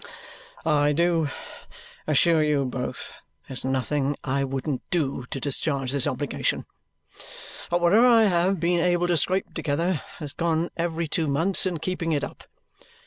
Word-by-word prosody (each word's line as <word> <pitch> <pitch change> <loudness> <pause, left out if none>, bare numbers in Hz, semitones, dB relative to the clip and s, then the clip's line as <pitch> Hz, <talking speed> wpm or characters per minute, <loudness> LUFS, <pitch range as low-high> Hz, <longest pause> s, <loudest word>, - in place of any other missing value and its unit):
"I 150 -2 +3
do 165 -1 +2 0.8
assure 155 +2 +4
you 150 -2 +2
both, 125 0 -5 0.3
there's 130 - -5
nothing 135 +2 0
I 140 0 0
wouldn't 135 0 -2
do 135 -7 -1
to 135 - -4
discharge 135 -1 -1
this 140 -2 0
obligation. - - -1 1.0
But 175 0 +1
whatever 205 +8 +6
I 230 -2 +6
have 185 -1 +2
been 175 +1 +2
able 175 0 +2
to 175 -1 +2
scrape 185 +5 0
together 165 +2 -1 0.2
has 145 -3 -7
gone 165 0 0
every 170 -1 -1
two 160 +1 -1
months 165 +8 +1
in 180 -2 -2
keeping 165 0 -2
it 145 - 0
up. - - -7
160 Hz, 145 wpm, -25 LUFS, 140-175 Hz, 1.0 s, whatever